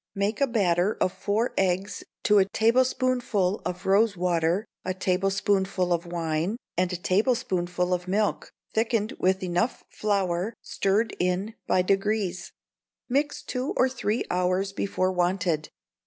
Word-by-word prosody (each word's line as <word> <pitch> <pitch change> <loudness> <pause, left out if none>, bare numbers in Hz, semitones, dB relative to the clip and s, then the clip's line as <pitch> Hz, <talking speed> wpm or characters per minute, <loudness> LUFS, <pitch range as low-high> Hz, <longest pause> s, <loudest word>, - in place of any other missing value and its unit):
Make 200 +4 -1
a 275 - +4
batter 195 -4 +1
of 185 - +2
four 215 +4 -1
eggs 190 +1 0 0.2
to 210 -1 +5
a 190 - +5
tablespoonful 235 -2 +1
of 180 +1 -5
rose 200 +1 +3
water, 175 +2 +1 0.2
a 185 0 -2
tablespoonful 190 0 +1
of 170 0 -2
wine, 170 +4 -1 0.2
and 180 +1 +1
a - - -2
tablespoonful 180 -3 0
of 180 0 -2
milk, 205 +3 0 0.2
thickened 225 0 +1
with 190 0 +1
enough 180 +6 -1
flour, 195 0 -1
stirred 205 +4 0
in 180 +4 0
by 180 - +3
degrees; 195 -1 0 0.6
mix 285 +3 0
two 255 +2 -3
or 255 - +5
three 240 -3 -1
hours 185 +2 +1
before 185 -1 0
wanted. 175 -3 0
195 Hz, 135 wpm, -26 LUFS, 180-215 Hz, 0.6 s, to